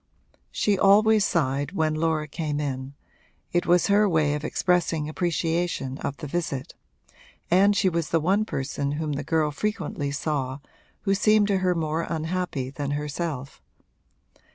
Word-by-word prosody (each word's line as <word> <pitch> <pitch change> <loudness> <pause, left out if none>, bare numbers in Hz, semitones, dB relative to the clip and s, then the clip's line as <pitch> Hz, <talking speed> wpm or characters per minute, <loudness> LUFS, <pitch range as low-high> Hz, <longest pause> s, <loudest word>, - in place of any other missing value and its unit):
She 205 -2 +1
always 210 +2 +5
sighed 145 -2 0
when 160 -4 +1
Laura 155 -1 0
came 150 0 -3
in 135 -1 -4 0.6
it 175 0 +1
was 175 0 +4
her 205 +1 +4
way 155 -4 +2
of 150 0 -3
expressing 170 -2 0
appreciation 165 -4 -1
of 140 - -4
the 160 - -7
visit 150 -3 -3 0.8
and 200 +3 +5
she 200 -1 +2
was 170 -3 0
the 165 - +2
one 190 +7 +2
person 140 -6 -3
whom 155 0 -2
the 145 +1 -3
girl 155 0 +1
frequently 155 -5 -3
saw 140 -2 -2 0.4
who 195 - +1
seemed 210 +1 +3
to 195 -2 +2
her 180 -1 +1
more 160 0 -1
unhappy 160 -5 -2
than 140 0 -4
herself. 145 - -4
160 Hz, 150 wpm, -25 LUFS, 145-180 Hz, 0.8 s, always